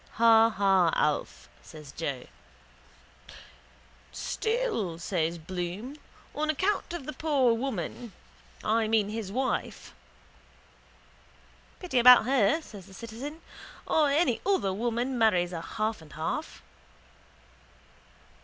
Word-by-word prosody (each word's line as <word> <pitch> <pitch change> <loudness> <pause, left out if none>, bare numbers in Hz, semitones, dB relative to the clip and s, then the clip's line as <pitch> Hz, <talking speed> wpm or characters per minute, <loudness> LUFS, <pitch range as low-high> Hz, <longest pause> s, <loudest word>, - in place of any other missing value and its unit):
—Ha 225 0 +6
ha, 195 -5 +3
Alf, 150 -1 -1
says 150 -4 -12
Joe. 140 -5 -4 1.9
—Still, 440 - -2
says 170 -1 -2
Bloom, 180 - -5 0.4
on 310 +1 -2
account 375 +6 0
of 340 -6 -6
the 305 - -5
poor 280 -7 +2
woman, 230 - -4 0.5
I 220 +1 +1
mean 215 -2 +2
his 215 -3 -5
wife. 260 +4 -3 1.9
—Pity 345 -9 0
about 250 -1 +8
her, 260 +4 +2
says 200 -8 -12
the 190 - -14
citizen. 250 - -8 0.4
Or 305 -2 +2
any 280 -4 +1
other 375 - +1
woman 240 +4 -2
marries 180 -6 +2
a 165 - -4
half 215 +3 -3
and 155 - -15
half. 155 +1 -4
225 Hz, 105 wpm, -28 LUFS, 185-270 Hz, 1.9 s, about